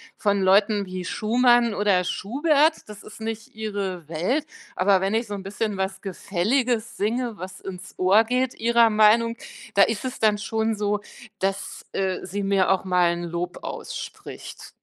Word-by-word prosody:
von 200 Hz, -1 st, +1 dB
Leuten 200 Hz, +2 st, +4 dB
wie 185 Hz, -1 st, -6 dB
Schumann 240 Hz, +2 st, +3 dB
oder 200 Hz, -3 st, +2 dB
Schubert, 295 Hz, -, +1 dB
das 210 Hz, -1 st, -10 dB
ist 215 Hz, -, -13 dB
nicht 225 Hz, 0 st, -6 dB
ihre 200 Hz, -6 st, -4 dB
Welt, 235 Hz, -, 0 dB, 0.3 s
aber 190 Hz, 0 st, +3 dB
wenn 195 Hz, +3 st, 0 dB
ich 230 Hz, -, 0 dB
so 205 Hz, -, -5 dB
'n 200 Hz, -, -4 dB
bisschen 210 Hz, +2 st, -3 dB
was 190 Hz, 0 st, -3 dB
Gefälliges 220 Hz, +5 st, -1 dB
singe, 230 Hz, +1 st, -1 dB
was 185 Hz, +1 st, -8 dB
ins 190 Hz, 0 st, -9 dB
Ohr 195 Hz, +5 st, +5 dB
geht 250 Hz, +2 st, 0 dB
ihrer 235 Hz, 0 st, +3 dB
Meinung, 225 Hz, +2 st, +4 dB, 0.4 s
da 200 Hz, -, +4 dB
ist 225 Hz, +4 st, +2 dB
es 255 Hz, -, -4 dB
dann 215 Hz, -1 st, +3 dB
schon 220 Hz, +1 st, -1 dB
so, 205 Hz, 0 st, 0 dB, 0.4 s
dass, 195 Hz, +1 st, -3 dB
äh, 190 Hz, -1 st, -1 dB
sie 200 Hz, +2 st, -4 dB
mir 195 Hz, -1 st, +2 dB
auch 190 Hz, -1 st, +2 dB
mal 180 Hz, -2 st, +3 dB
'n 175 Hz, 0 st, -5 dB
Lob 175 Hz, +1 st, -4 dB
ausspricht. -, -, -8 dB
205 Hz, 165 wpm, -24 LUFS, 190-225 Hz, 0.4 s, Ohr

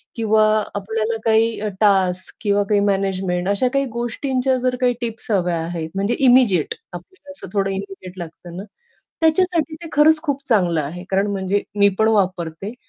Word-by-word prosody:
किंवा 220 Hz, -1 st, +3 dB, 0.3 s
आपल्याला 220 Hz, +2 st, -2 dB
काही 225 Hz, 0 st, +2 dB, 0.2 s
टास्क 185 Hz, -3 st, +2 dB
किंवा 205 Hz, -1 st, +2 dB
काही 205 Hz, -1 st, +3 dB
मॅनेजमेंट. 190 Hz, -2 st, -1 dB
अशा 205 Hz, +6 st, +2 dB
काही 275 Hz, 0 st, +1 dB
गोष्टींच्या 255 Hz, +2 st, -1 dB
जर 250 Hz, 0 st, 0 dB
काही 245 Hz, -1 st, +3 dB
टिप्स 230 Hz, 0 st, -5 dB
हव्या 180 Hz, -4 st, +1 dB
आहेत, 165 Hz, -1 st, -5 dB
म्हणजे 200 Hz, +5 st, 0 dB
इमिडिएट 245 Hz, -, +4 dB, 0.2 s
आपल्याला 285 Hz, -, -11 dB
असं 285 Hz, -, -9 dB
थोडं 195 Hz, -1 st, +1 dB
इमिडिएट 190 Hz, -1 st, -7 dB
लागतं 170 Hz, +1 st, -9 dB
ना 195 Hz, -, -5 dB, 0.6 s
त्याच्यासाठी 325 Hz, -1 st, +2 dB
ते 330 Hz, -, -7 dB
खरंच 310 Hz, +1 st, +4 dB
खूप 280 Hz, -3 st, -2 dB
चांगलं 175 Hz, -8 st, +2 dB
आहे. 175 Hz, +6 st, -7 dB
कारण 195 Hz, +2 st, +1 dB
म्हणजे 195 Hz, +1 st, -1 dB, 0.2 s
मी 200 Hz, 0 st, +6 dB
पण 220 Hz, 0 st, +3 dB
वापरते. 185 Hz, -1 st, -1 dB
205 Hz, 160 wpm, -20 LUFS, 185-245 Hz, 0.6 s, मी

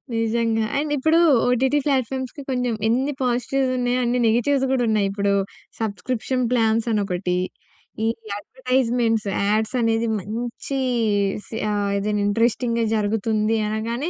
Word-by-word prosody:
నిజంగా. 225 Hz, 0 st, +1 dB
అండ్ 295 Hz, +1 st, -1 dB
ఇప్పుడు 315 Hz, +4 st, +3 dB, 0.3 s
ఓటీటీ 260 Hz, +4 st, +2 dB
ప్లాట్‍ఫామ్స్‌కి 265 Hz, 0 st, -1 dB
కొంచం, 250 Hz, -2 st, 0 dB
ఎన్ని 265 Hz, +5 st, +1 dB
పాజిటివ్స్ 255 Hz, +2 st, 0 dB
ఉన్నాయో, 245 Hz, 0 st, +1 dB
అన్ని 245 Hz, +1 st, +1 dB
నెగటివ్స్ 260 Hz, +5 st, +2 dB
కూడా 260 Hz, -2 st, +2 dB
ఉన్నాయి. 210 Hz, -2 st, +2 dB
ఇప్పుడు, 200 Hz, 0 st, 0 dB, 0.5 s
సబ్స్క్రిప్షన్ 225 Hz, +4 st, -2 dB
ప్లాన్స్ 225 Hz, -1 st, +2 dB
అని 210 Hz, -2 st, +2 dB
ఒకటి, 180 Hz, -1 st, -1 dB, 0.7 s
ఈ -, -, +2 dB, 0.3 s
అడ్వర్టైజ్మెంట్స్, 245 Hz, -2 st, 0 dB, 0.2 s
యాడ్స్ 215 Hz, +3 st, 0 dB
అనేది 225 Hz, 0 st, +1 dB
మంచి 235 Hz, +6 st, -4 dB, 0.7 s
సి 225 Hz, -, -6 dB
ఆహ్, 205 Hz, -1 st, 0 dB
ఏదైనా 205 Hz, +1 st, -1 dB
ఇంట్రెస్టింగ్‍గా 230 Hz, +2 st, +1 dB
జరుగుతుంది 215 Hz, +1 st, 0 dB
అనగానే, 230 Hz, +8 st, -2 dB
230 Hz, 125 wpm, -22 LUFS, 220-255 Hz, 0.7 s, ఇప్పుడు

